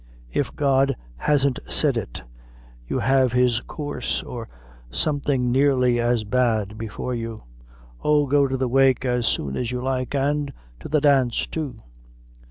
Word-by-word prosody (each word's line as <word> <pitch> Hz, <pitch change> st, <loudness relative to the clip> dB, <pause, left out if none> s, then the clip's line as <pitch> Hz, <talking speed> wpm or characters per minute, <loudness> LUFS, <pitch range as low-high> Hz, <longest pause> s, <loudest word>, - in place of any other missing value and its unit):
If -, -, -2 dB
God 135 Hz, -1 st, +2 dB, 0.2 s
hasn't 140 Hz, -, +1 dB
said 145 Hz, -4 st, +3 dB
it, 100 Hz, -, -5 dB, 0.6 s
you -, -, -1 dB
have 130 Hz, -2 st, +2 dB
his 125 Hz, -2 st, +2 dB
coorse, 145 Hz, -2 st, -3 dB
or 115 Hz, -2 st, -7 dB, 0.4 s
something 140 Hz, -, 0 dB
nearly 130 Hz, -2 st, +3 dB
as 120 Hz, -1 st, +1 dB
bad, 110 Hz, -2 st, 0 dB
before 115 Hz, +3 st, -5 dB
you. 115 Hz, -2 st, -5 dB, 0.6 s
Oh! 150 Hz, -1 st, +3 dB
go 140 Hz, 0 st, +3 dB
to 130 Hz, 0 st, -2 dB
the 130 Hz, 0 st, 0 dB
wake 135 Hz, 0 st, +3 dB
as 125 Hz, -2 st, +1 dB
soon 70 Hz, -2 st, -1 dB
as 120 Hz, -, -2 dB
you 125 Hz, -, -2 dB
like, 130 Hz, +1 st, -2 dB
an' 140 Hz, +1 st, 0 dB, 0.3 s
to -, -, -8 dB
the 150 Hz, 0 st, +2 dB
dance, 135 Hz, -5 st, +3 dB
too. 140 Hz, -8 st, -5 dB
130 Hz, 150 wpm, -23 LUFS, 120-140 Hz, 0.6 s, said